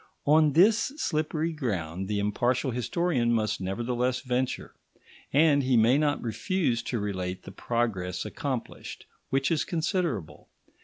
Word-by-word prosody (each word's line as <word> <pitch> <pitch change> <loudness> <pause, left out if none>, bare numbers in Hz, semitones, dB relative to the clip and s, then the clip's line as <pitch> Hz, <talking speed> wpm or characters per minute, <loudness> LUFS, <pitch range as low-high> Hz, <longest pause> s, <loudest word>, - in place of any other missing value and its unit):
On 150 0 +5
this 215 - +4
slippery 155 - -1
ground 95 - -3
the 105 0 -1
impartial 120 +6 0
historian 125 +1 0
must 110 -4 0
nevertheless 120 +6 -1
venture; 125 0 -2 0.6
and 145 0 +4
he 130 -2 +2
may 120 +5 +5
not 145 -1 0
refuse 125 - 0
to 120 - -3
relate 95 -3 -3
the - - -9
progress 95 -5 -2
accomplished, 130 -4 -5 0.2
which 135 +4 +1
is 160 - +2
considerable. 165 - -2
125 Hz, 125 wpm, -27 LUFS, 105-155 Hz, 0.6 s, On